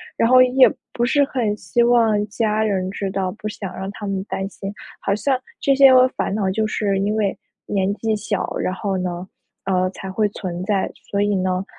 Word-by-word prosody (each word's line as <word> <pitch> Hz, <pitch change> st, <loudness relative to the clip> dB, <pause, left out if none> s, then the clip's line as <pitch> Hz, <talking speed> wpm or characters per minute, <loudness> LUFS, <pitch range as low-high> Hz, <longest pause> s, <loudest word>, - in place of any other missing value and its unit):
然 230 Hz, -, +2 dB
后 255 Hz, 0 st, +7 dB
也 255 Hz, +1 st, +5 dB, 0.2 s
不 240 Hz, -, 0 dB
是 285 Hz, +3 st, +3 dB
很 235 Hz, -6 st, -1 dB
希 240 Hz, +2 st, +1 dB
望 225 Hz, -3 st, +3 dB
家 215 Hz, 0 st, 0 dB
人 190 Hz, -3 st, 0 dB
知 195 Hz, 0 st, -4 dB
道， 190 Hz, -1 st, -1 dB
不 215 Hz, -, -5 dB
想 195 Hz, -3 st, -7 dB
让 190 Hz, +1 st, -5 dB
他 205 Hz, 0 st, -7 dB
们 195 Hz, -1 st, -2 dB
担 195 Hz, -1 st, -4 dB
心。 195 Hz, 0 st, -7 dB, 0.3 s
好 200 Hz, -, 0 dB
像 260 Hz, +6 st, +1 dB, 0.2 s
这 275 Hz, -3 st, +2 dB
些 270 Hz, -1 st, +7 dB
个 255 Hz, 0 st, +7 dB
烦 255 Hz, -, -3 dB
恼， 200 Hz, -2 st, 0 dB
就 215 Hz, +3 st, 0 dB
是 205 Hz, -2 st, 0 dB
因 205 Hz, +2 st, 0 dB
为 205 Hz, -3 st, 0 dB, 0.3 s
年 195 Hz, -1 st, 0 dB
纪 220 Hz, 0 st, -1 dB
小， 205 Hz, -1 st, -3 dB
然 185 Hz, -, -1 dB
后 195 Hz, 0 st, -2 dB
呢， 180 Hz, 0 st, -4 dB, 0.4 s
呃， 185 Hz, -1 st, +1 dB
才 190 Hz, 0 st, -8 dB
会 210 Hz, +2 st, 0 dB
存 180 Hz, -3 st, -5 dB
在。 195 Hz, -1 st, 0 dB, 0.2 s
所 200 Hz, -, +1 dB
以 205 Hz, 0 st, +1 dB
呢 185 Hz, 0 st, -1 dB
205 Hz, 225 characters per minute, -21 LUFS, 190-225 Hz, 0.4 s, 后